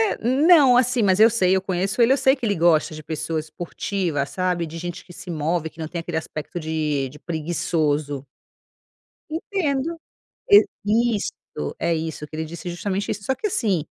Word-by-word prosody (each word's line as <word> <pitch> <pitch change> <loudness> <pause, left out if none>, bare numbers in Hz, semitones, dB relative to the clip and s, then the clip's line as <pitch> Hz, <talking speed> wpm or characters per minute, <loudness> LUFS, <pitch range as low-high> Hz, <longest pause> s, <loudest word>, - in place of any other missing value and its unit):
É, - - -6
não, 280 0 +6
assim, 250 -1 +3
mas 190 0 +3
eu 225 +1 +8
sei, 190 -5 +3
eu 190 - +1
conheço 190 +4 0
ele, 235 +3 +5
eu - - +4
sei 265 0 +4
que 265 - -7
ele 205 -4 +1
gosta 160 -2 +3
de 155 - -8
pessoa 160 +1 -3
esportiva, 160 0 -3
sabe, 180 +1 -1
de 160 +1 -9
gente 175 +1 -6
que 175 - -14
se 180 - -9
move, 160 +1 -1
que 160 - -25
não 160 - -4
tem 170 +2 -4
aquele 165 0 -5
aspecto 160 +1 -5
de 155 -4 -1
de 150 +3 -13
preguiçoso. 155 -4 -1 1.1
Entendo, 325 -2 -2 0.5
e, 205 +1 +8 0.5
isso, 205 - -2 0.5
é 170 0 +1
isso, 160 -1 -4
que 155 - -10
ele 160 0 -3
disse 170 +3 -8
é - - -2
justamente 195 +3 -3
isso, 200 - -5
só 265 - 0
que 425 - -2
assim 195 - 0
175 Hz, 195 wpm, -23 LUFS, 160-215 Hz, 1.1 s, eu